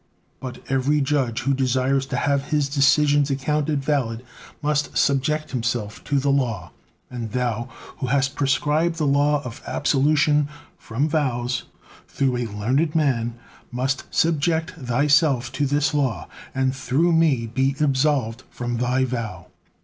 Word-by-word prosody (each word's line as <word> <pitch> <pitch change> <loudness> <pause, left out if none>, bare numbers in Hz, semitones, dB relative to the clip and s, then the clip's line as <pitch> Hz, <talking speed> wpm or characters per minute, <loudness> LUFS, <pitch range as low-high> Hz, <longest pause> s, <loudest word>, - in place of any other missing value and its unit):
But 125 -2 -8
every 135 +3 +1
judge 135 -4 0
who 135 +3 +1
desires 130 +1 +1
to - - -3
have 140 -1 +1
his 150 -2 0
decisions 145 +1 +3
accounted 145 +1 -1
valid, 125 -5 -1 0.4
must 150 0 0
subject 150 +2 +1
himself 115 -4 -3
to 145 - 0
the 140 +1 +2
law, 125 -6 -1 0.4
and 115 -4 -5
Thou 120 -1 -1 0.3
who 130 - -3
has 135 +1 +2
prescribed 150 +5 0
the 160 -2 -1
law 145 +1 +2
of 125 +3 -8
absolution 150 +1 +2 0.3
from 130 +7 -2
vows 125 -5 -1 0.4
through 130 -3 0
a 120 -1 -2
learned 130 +10 0
man, 120 -7 +1 0.4
must 130 +2 -1
subject 160 0 +1
Thyself 140 -2 +2
to 140 +1 0
this 145 +1 +1
law, 135 -7 -1 0.3
and 130 0 +1
through 135 +6 +1
me 160 -8 +3
be 130 +4 0
absolved 135 -5 +1
from 120 -1 -4
Thy 125 +2 +1
vow." 110 -8 -5
135 Hz, 140 wpm, -23 LUFS, 125-145 Hz, 0.4 s, decisions